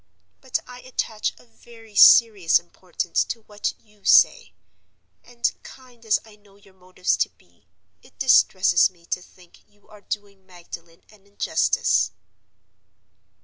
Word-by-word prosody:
But 260 -2 -2
I 250 0 -12
attach 230 -4 -4
a - - -20
very 230 -2 -18
serious 205 -5 +6
importance 175 0 -3
to 230 - -6
what 210 -1 -5
you 210 -2 -29
say; - - +4 0.7
and, 240 -1 -2
kind 250 -3 -16
as 210 - +3
I 215 -1 -18
know 205 -1 -25
your 200 -1 -23
motives 185 0 -2
to - - 0
be, - - -32 0.3
it - - -23
distresses 220 -7 +4
me 175 -2 -25
to 180 - -4
think 180 -1 -21
you 205 0 -31
are 210 -1 -16
doing 200 -2 -7
Magdalen 170 -2 -13
an 200 -2 -23
injustice. 100 - 0
205 Hz, 140 wpm, -23 LUFS, 180-225 Hz, 0.7 s, serious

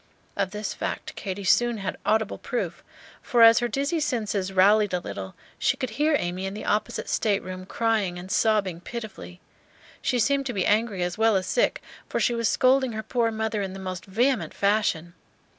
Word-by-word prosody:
Of 195 -2 0
this 210 +2 -4
fact - - -5
Katy 195 0 -5
soon 240 +4 +3
had 195 -2 -4
audible 220 -1 +1
proof; - - -4 0.4
for 240 -3 +3
as 230 0 +8
her 240 - 0
dizzy 280 +6 -1
senses 215 -9 -1
rallied 200 +1 +4
a - - 0
little, 95 - -7 0.2
she - - +1
could 255 -3 -3
hear 300 +6 +2
Amy 180 0 -3
in 195 - -5
the - - -6
opposite 210 - -1
stateroom 185 -3 -1
crying 215 -6 0
and 180 +2 -8
sobbing 205 -6 +1
pitifully. 220 -5 -8 0.6
She 250 - 0
seemed 275 +4 +1
to 245 - -3
be 190 - 0
angry 210 -3 +1
as 180 +3 -3
well 225 -1 +4
as 185 -1 +1
sick, - - +1 0.3
for - - -1
she 240 - +2
was 230 -1 +1
scolding 260 -1 +3
her 220 0 -4
poor 235 -1 0
mother 220 -1 -2
in 190 -1 -4
the 195 - -8
most 185 -1 -6
vehement 225 - 0
fashion. 200 -5 +1
215 Hz, 190 wpm, -25 LUFS, 190-235 Hz, 0.6 s, as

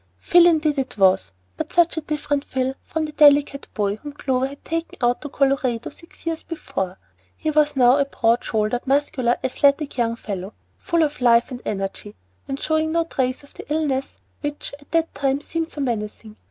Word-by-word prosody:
Phil 345 - +5
indeed 310 -3 +2
it 265 -4 -4
was, 185 - +3 0.3
but - - -4
such 345 -1 +3
a 320 - -2
different 295 -1 -2
Phil 260 -1 -1
from 320 -1 -2
the 305 - -6
delicate 290 -2 +4
boy 205 -1 0
whom 290 +4 -9
Clover 265 -2 0
had 280 +1 -12
taken 330 0 -3
out 245 -1 +1
to 295 - -6
Colorado 270 -4 0
six 335 - -16
years 330 -1 -2
before. 190 - -4 0.4
He 310 - -1
was 300 -1 +3
now 250 0 +5
a 280 - +3
broad 235 -3 +1
shouldered, 220 +3 -1
muscular, 265 -3 +1
athletic 280 +2 +2
young 230 -1 +1
fellow, 200 -3 -6 0.2
full 340 -3 +1
of 295 -3 -2
life 235 +1 +4
and 250 -1 -6
energy, 195 +1 -4 0.3
and 270 0 -4
showing 315 0 0
no 335 0 +3
trace 260 -5 -2
of 285 - -18
the - - -11
illness 285 -4 -1 0.2
which 290 -1 -5
at 285 - -21
that 330 0 +1
time 275 0 0
seemed 325 +2 -3
so 295 - -5
menacing. 215 -3 -4
275 Hz, 190 wpm, -22 LUFS, 240-305 Hz, 0.4 s, Phil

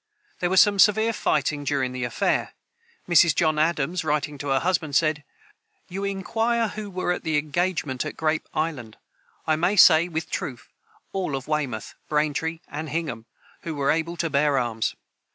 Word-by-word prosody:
There 175 - 0
was 190 0 +4
some 205 -1 +5
severe 220 +3 +4
fighting 145 -5 0
during 135 -3 0
the 125 -1 -3
affair. 120 - 0 0.5
Mrs. 170 -3 +5
John 155 -2 +2
Adams, 165 +2 0
writing 150 -1 -1
to 145 - -5
her 135 -1 +2
husband, 165 -5 0
said: 155 -1 +2 0.7
"You 195 +2 -5
inquire 225 +4 0
who 210 0 -6
were 185 -1 -2
at 180 - -2
the 160 -3 0
engagement 155 -3 -1
at 155 - -6
Grape 155 0 -1
island. 140 -9 -3 0.5
I 155 - +2
may 175 +5 +1
say 170 -3 +7
with 160 -1 -4
truth, 125 -3 -5 0.4
all 185 -7 -2
of 135 -1 -6
Weymouth, 140 -8 -2 0.2
Braintree, 155 +2 -1
and 150 +2 -6
Hingham, 155 -7 -4 0.3
who 165 -2 -5
were 140 -1 +1
able 165 +2 -1
to 165 0 -1
bear 140 0 +2
arms.... 115 -3 -1
155 Hz, 170 wpm, -24 LUFS, 145-175 Hz, 0.7 s, say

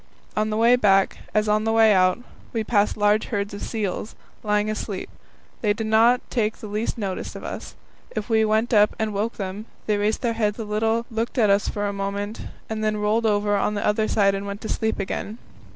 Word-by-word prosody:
On 215 0 +1
the 215 - -1
way 235 +2 +6
back, 195 -5 +3
as 215 0 +1
on 210 +1 +2
the 225 - +1
way 225 -1 +5
out, 185 -1 +4 0.4
we 225 -2 0
passed 210 -1 +1
large 210 +1 +3
herds 200 -2 -3
of 205 - -7
seals, 210 -1 -3 0.3
lying 210 0 +1
asleep. 215 -2 -4 0.5
They 210 -2 +2
did 220 +1 -4
not 230 +3 +4
take 220 -3 0
the - - -9
least 210 +4 -2
notice 195 -4 -4
of - - -8
us. - - -7 0.4
If 215 -2 -3
we 220 -1 +3
went 220 +2 +1
up 210 -1 +5
and 220 -1 -1
woke 210 +4 -1
them, 200 +2 -6 0.2
they 215 - +1
just - - -2
raised 215 +1 0
their 235 -1 +1
heads 210 -2 0
a 225 - -4
little, 220 +2 0
looked 230 +3 -3
at 215 -4 +4
us 200 +1 +2
for 205 0 -2
a 200 - -1
moment, 200 +2 -4 0.2
and 220 -1 -3
then 215 0 +1
rolled 215 +2 +1
over 205 -1 +2
on 210 +1 0
the 205 - -2
other 215 +1 +2
side 195 -2 +3
and 195 +1 -4
went 200 +1 -6
to 220 - -6
sleep 220 0 -1
again. 205 +2 -4
215 Hz, 225 wpm, -23 LUFS, 205-220 Hz, 0.5 s, way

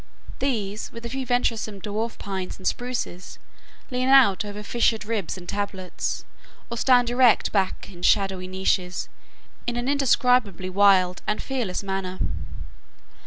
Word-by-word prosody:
These, 215 -6 -2
with 230 0 -9
a - - -4
few 265 +1 -4
venturesome 230 -4 0
Dwarf 215 +3 -3
Pines 190 -2 -5
and 185 - -13
Spruces, 240 -6 -3 0.5
lean 255 +1 0
out 255 -8 +6
over 205 0 -7
fissured 225 0 +1
ribs 210 -6 -2
and 175 -1 -11
tablets, 195 -2 -3 0.5
or 235 - -3
stand 245 -2 +4
erect 245 -1 +4
back 190 -3 0
in 180 -3 -12
shadowy 190 -1 +2
niches, 185 -1 -1 0.6
in 240 - -1
an 240 +1 -2
indescribably 250 -8 +2
wild 185 -2 +4
and 210 - 0
fearless 240 -9 -3
manner. 190 -1 -3
210 Hz, 135 wpm, -25 LUFS, 190-245 Hz, 0.6 s, out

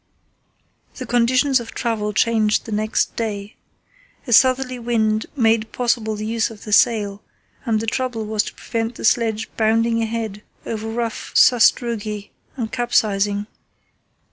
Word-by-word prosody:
The 255 - -6
conditions 250 +3 +2
of 235 -1 -9
travel 220 -3 -1
changed 215 +1 +1
the 225 - -8
next 215 +1 0
day. 210 -2 -4 0.7
A 240 - -1
southerly 255 +1 +3
wind 220 -2 0
made 225 -3 +2
possible 230 -3 0
the 210 0 -5
use 225 +1 0
of 220 -2 -12
the 210 - -4
sail, 205 -3 +3 0.4
and 225 -3 +1
the 225 - -3
trouble 235 -1 -2
was 215 0 0
to - - -8
prevent 230 0 -3
the - - -5
sledge 220 -1 +1
bounding 230 +1 +2
ahead 220 -2 -3 0.2
over 225 0 -4
rough 230 0 -4
sastrugi 225 -4 +3 0.3
and 225 -3 -3
capsizing. 205 -4 +1
225 Hz, 140 wpm, -21 LUFS, 215-235 Hz, 0.7 s, southerly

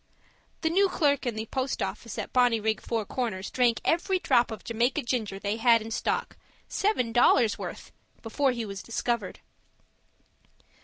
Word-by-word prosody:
The 320 - +1
new 390 +3 +4
clerk 285 -6 +1
in 235 - -1
the 220 0 -4
post 260 +3 -2
office - - -4
at - - -5
Bonnyrigg 225 -4 +2
Four 225 -3 -2
Corners 205 -5 -3
drank 245 -2 +2
every 350 +3 +2
drop 240 -8 +2
of 220 - -7
Jamaica 240 +6 0
ginger 225 -5 -2
they 200 +2 -2
had 230 0 +5
in 225 +1 -8
stock - - -2 0.3
seven 390 - 0
dollars' 235 -1 +4
worth - - -7 0.3
before 265 +4 +1
he 235 -2 -3
was 195 -1 -6
discovered. 235 0 -3
235 Hz, 155 wpm, -27 LUFS, 220-260 Hz, 0.3 s, had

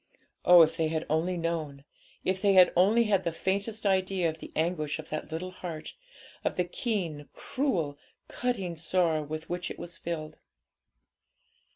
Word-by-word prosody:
Oh, 175 -1 +9
if 165 +1 0
they 160 -2 +2
had 160 0 -2
only 170 +3 +1
known! 160 -5 -3 0.4
if 185 0 0
they 200 -1 +4
had 185 -1 +7
only 210 +7 +5
had 200 -4 +2
the 170 - 0
faintest 200 +6 -2
idea 190 -2 +2
of 160 0 -7
the - - -9
anguish 155 -2 0
of 160 -1 -9
that 155 +1 -5
little 180 +3 -4
heart, 170 -4 -7 0.5
of - - -1
the 180 - +2
keen, 175 - -3
cruel, 170 - -2 0.3
cutting 200 -9 -2
sorrow 165 -1 +1
with 155 +2 -6
which 175 0 -3
it - - -7
was 175 -1 -7
filled! 155 -2 -5
175 Hz, 165 wpm, -29 LUFS, 160-190 Hz, 0.5 s, Oh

